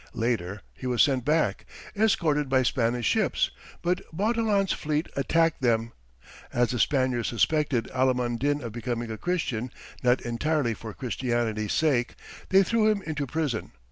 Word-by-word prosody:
Later, 105 Hz, -4 st, -1 dB
he 130 Hz, -, -6 dB
was 125 Hz, -2 st, +4 dB
sent 130 Hz, -4 st, +1 dB
back, 155 Hz, +4 st, +1 dB, 0.3 s
escorted 160 Hz, -9 st, +2 dB
by 130 Hz, -1 st, +3 dB
Spanish 120 Hz, -1 st, 0 dB
ships, -, -, +1 dB, 0.3 s
but 180 Hz, +2 st, +1 dB
Bautilan's 205 Hz, +1 st, +1 dB
fleet 150 Hz, +1 st, -1 dB
attacked 165 Hz, +3 st, +2 dB
them. 115 Hz, -2 st, +1 dB, 0.6 s
As 120 Hz, 0 st, +1 dB
the 120 Hz, -, -2 dB
Spaniards 130 Hz, -4 st, +1 dB
suspected 135 Hz, -1 st, +1 dB
Alimund 125 Hz, -2 st, +1 dB
Din 145 Hz, +1 st, 0 dB
of 115 Hz, -, -5 dB
becoming 120 Hz, 0 st, -3 dB
a 110 Hz, -, -4 dB
Christian 130 Hz, -10 st, -1 dB, 0.3 s
not 125 Hz, +1 st, +3 dB
entirely 120 Hz, +1 st, 0 dB
for 110 Hz, -1 st, -8 dB
Christianity's 120 Hz, -4 st, -1 dB
sake, 135 Hz, -6 st, +1 dB, 0.3 s
they 195 Hz, +1 st, +6 dB
threw 220 Hz, +2 st, +2 dB
him 205 Hz, -2 st, 0 dB
into 150 Hz, -3 st, -3 dB
prison. 145 Hz, -5 st, -2 dB
130 Hz, 145 wpm, -27 LUFS, 120-160 Hz, 0.6 s, they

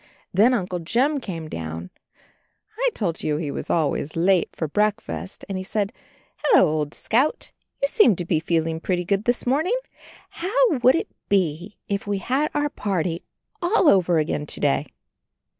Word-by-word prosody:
Then 225 Hz, +7 st, +5 dB
Uncle 180 Hz, -4 st, -2 dB
Jim 260 Hz, -, +1 dB
came 170 Hz, -9 st, -6 dB
downstairs. 80 Hz, -, -6 dB, 0.8 s
I -, -, +2 dB
told 175 Hz, -7 st, -2 dB
you 150 Hz, -1 st, 0 dB
he 150 Hz, -2 st, -3 dB
was -, -, -6 dB
always 155 Hz, -2 st, 0 dB
late 180 Hz, +1 st, +3 dB
for 160 Hz, -, -2 dB
breakfast; 210 Hz, +2 st, -2 dB
and 195 Hz, -1 st, -3 dB
he -, -, -4 dB
said, 205 Hz, +2 st, -2 dB, 0.4 s
"Hello, 445 Hz, -, +5 dB
old 150 Hz, -1 st, -2 dB
Scout. 265 Hz, +7 st, 0 dB, 0.3 s
You -, -, +5 dB
seem 280 Hz, -, +5 dB
to 175 Hz, -, -4 dB
be 165 Hz, -2 st, +1 dB
feeling 165 Hz, 0 st, 0 dB
pretty 180 Hz, +1 st, -1 dB
good 200 Hz, +3 st, 0 dB
this 245 Hz, 0 st, 0 dB
morning. 315 Hz, -, +2 dB, 0.5 s
How 455 Hz, +7 st, +2 dB
would 255 Hz, +2 st, +6 dB
it 360 Hz, +6 st, -2 dB, 0.2 s
be 185 Hz, 0 st, 0 dB
if 200 Hz, 0 st, -2 dB
we 205 Hz, -1 st, 0 dB
had 265 Hz, +10 st, 0 dB
our 295 Hz, 0 st, +1 dB
party 180 Hz, -4 st, -2 dB, 0.4 s
all 355 Hz, 0 st, +3 dB
over 180 Hz, -, +4 dB
again 150 Hz, -1 st, -1 dB
to -, -, -5 dB
day?" 145 Hz, 0 st, +1 dB
195 Hz, 165 wpm, -23 LUFS, 165-250 Hz, 0.8 s, would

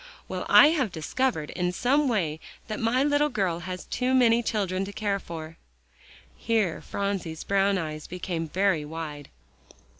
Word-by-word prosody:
Well, -, -, -4 dB
I 290 Hz, -, +9 dB
have 275 Hz, -, 0 dB
discovered 160 Hz, -, -1 dB
in 180 Hz, -1 st, -1 dB
some 275 Hz, +9 st, +2 dB
way 170 Hz, -10 st, 0 dB, 0.3 s
that 215 Hz, -, -3 dB
my 240 Hz, +4 st, +2 dB
little 290 Hz, +1 st, +2 dB
girl 190 Hz, -, -1 dB
has 185 Hz, +1 st, -6 dB
too 255 Hz, +1 st, 0 dB
many 235 Hz, -2 st, +5 dB
children 195 Hz, -5 st, -1 dB
to 200 Hz, -, -7 dB
care 205 Hz, -1 st, -1 dB
for." 160 Hz, -2 st, -8 dB, 0.8 s
Here 215 Hz, -7 st, 0 dB
Phronsie's 195 Hz, -5 st, -3 dB
brown 195 Hz, 0 st, +2 dB
eyes 155 Hz, -3 st, -5 dB
became 170 Hz, -2 st, -4 dB
very 185 Hz, -3 st, +1 dB
wide. 150 Hz, -2 st, -7 dB
195 Hz, 150 wpm, -26 LUFS, 165-230 Hz, 0.8 s, I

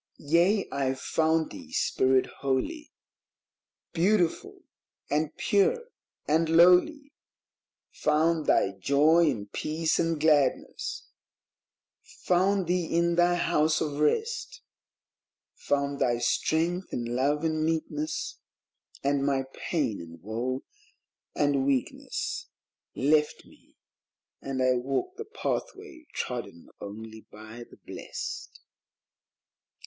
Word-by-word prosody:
Yea, 175 Hz, +7 st, +2 dB
I 135 Hz, -1 st, 0 dB
found 160 Hz, +3 st, 0 dB
thee, 260 Hz, -2 st, -11 dB
Spirit 130 Hz, -, +2 dB
holy, 215 Hz, -, -2 dB, 1.0 s
Beautiful 210 Hz, -, +1 dB, 0.5 s
and -, -, 0 dB
pure 470 Hz, +4 st, +1 dB, 0.4 s
and 160 Hz, +2 st, +2 dB
lowly; 180 Hz, -, +5 dB, 0.8 s
Found 155 Hz, +1 st, +1 dB
thy 95 Hz, -, +3 dB
Joy 150 Hz, -, +3 dB
and 105 Hz, -6 st, -4 dB
Peace 160 Hz, +1 st, -1 dB
and 165 Hz, -2 st, 0 dB
Gladness; 145 Hz, -4 st, +1 dB, 1.0 s
found 190 Hz, +2 st, 0 dB
thee 175 Hz, 0 st, 0 dB
in 170 Hz, +1 st, +1 dB
thy 175 Hz, +1 st, +3 dB
House 160 Hz, -3 st, +2 dB
of 145 Hz, -2 st, -3 dB
Rest; 435 Hz, -, -1 dB, 0.9 s
Found 140 Hz, 0 st, -1 dB
thy 120 Hz, -3 st, +2 dB
strength 165 Hz, +9 st, 0 dB
in 120 Hz, 0 st, -3 dB
Love 145 Hz, +4 st, +1 dB
and 155 Hz, -1 st, 0 dB
Meekness, 155 Hz, -1 st, -2 dB, 0.6 s
And 140 Hz, 0 st, +1 dB
my 135 Hz, -1 st, +1 dB
pain 145 Hz, -, -2 dB
and 85 Hz, 0 st, -11 dB
woe 120 Hz, +5 st, -3 dB, 0.7 s
and 145 Hz, -2 st, +2 dB
weakness 135 Hz, -2 st, -2 dB, 0.5 s
Left 150 Hz, +2 st, +1 dB
me, -, -, -22 dB, 0.7 s
and 130 Hz, -1 st, -2 dB
I 130 Hz, -1 st, +3 dB
walked 135 Hz, -, -2 dB
the 445 Hz, -, -6 dB
Pathway 390 Hz, -5 st, -5 dB
trodden 120 Hz, -9 st, -5 dB
only 110 Hz, +2 st, -9 dB
by 110 Hz, +3 st, -10 dB
the -, -, -16 dB
blest. -, -, -7 dB
155 Hz, 100 wpm, -28 LUFS, 130-175 Hz, 1.0 s, lowly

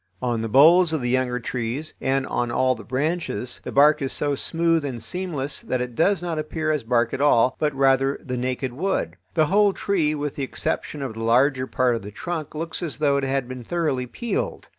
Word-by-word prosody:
On 120 Hz, 0 st, -1 dB
the 115 Hz, -, -3 dB
boles 160 Hz, +7 st, +6 dB
of 155 Hz, -, 0 dB
the 120 Hz, 0 st, -1 dB
younger 125 Hz, -1 st, 0 dB
trees 125 Hz, +5 st, -4 dB
and 135 Hz, 0 st, +1 dB
on 120 Hz, -2 st, -1 dB
all 130 Hz, +2 st, +2 dB
the -, -, -10 dB
branches, 130 Hz, -4 st, -2 dB
the -, -, -5 dB
bark 150 Hz, +2 st, +5 dB
is 135 Hz, -, -2 dB
so 145 Hz, -1 st, -1 dB
smooth 165 Hz, +2 st, 0 dB
and 135 Hz, -4 st, -4 dB
seamless 160 Hz, -7 st, -2 dB
that 130 Hz, -, -2 dB
it 125 Hz, 0 st, -4 dB
does 175 Hz, -, +2 dB
not 165 Hz, -3 st, -2 dB
appear 155 Hz, 0 st, -2 dB
as 150 Hz, -2 st, 0 dB
bark 120 Hz, 0 st, +1 dB
at -, -, -2 dB
all, 130 Hz, -4 st, +4 dB
but 150 Hz, -1 st, +1 dB
rather 135 Hz, 0 st, +3 dB
the 125 Hz, -, -4 dB
naked 125 Hz, 0 st, -2 dB
wood. 150 Hz, -, -1 dB, 0.2 s
The 155 Hz, -, +4 dB
whole 200 Hz, +4 st, +3 dB
tree, 165 Hz, -8 st, 0 dB
with 145 Hz, -1 st, -4 dB
the 140 Hz, -, -2 dB
exception 140 Hz, +2 st, -3 dB
of 130 Hz, -4 st, -4 dB
the 115 Hz, +1 st, -6 dB
larger 130 Hz, +3 st, +3 dB
part 125 Hz, -2 st, +1 dB
of 115 Hz, -, -4 dB
the 100 Hz, -, -8 dB
trunk, 155 Hz, +8 st, -5 dB
looks 165 Hz, +3 st, -4 dB
as 165 Hz, -5 st, -3 dB
though 140 Hz, -1 st, +2 dB
it 140 Hz, -, -1 dB
had 135 Hz, -1 st, -1 dB
been 130 Hz, -1 st, -7 dB
thoroughly 140 Hz, -4 st, -1 dB
peeled. 235 Hz, -, -4 dB
135 Hz, 220 wpm, -23 LUFS, 125-155 Hz, 0.2 s, boles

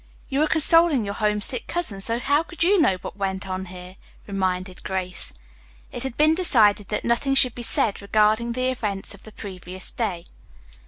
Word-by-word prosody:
"You 275 Hz, 0 st, -2 dB
were 310 Hz, -, +2 dB
consoling 320 Hz, -5 st, +4 dB
your 200 Hz, -, -4 dB
homesick 210 Hz, +3 st, -1 dB
cousin, 275 Hz, -, -2 dB
so 230 Hz, +4 st, +1 dB
how 285 Hz, +5 st, +1 dB
could 340 Hz, +1 st, -4 dB
you 380 Hz, +1 st, +3 dB
know 190 Hz, -11 st, +2 dB
what -, -, -8 dB
went 195 Hz, -1 st, -4 dB
on 185 Hz, 0 st, -5 dB
here?" 180 Hz, +1 st, -12 dB, 0.3 s
reminded 185 Hz, -2 st, -3 dB
Grace. 185 Hz, -1 st, 0 dB, 0.6 s
It 245 Hz, -, -6 dB
had 265 Hz, -2 st, -6 dB
been 310 Hz, +1 st, +4 dB
decided 220 Hz, -, +4 dB
that -, -, -4 dB
nothing 255 Hz, +4 st, 0 dB
should 255 Hz, -3 st, +4 dB
be 240 Hz, -, -8 dB
said 220 Hz, -3 st, +3 dB
regarding 215 Hz, +3 st, +1 dB
the 255 Hz, +1 st, -1 dB
events 205 Hz, -6 st, -3 dB
of 200 Hz, -, -15 dB
the 220 Hz, -, -14 dB
previous 185 Hz, -3 st, -4 dB
day. 185 Hz, -7 st, -4 dB
215 Hz, 180 wpm, -22 LUFS, 190-265 Hz, 0.6 s, consoling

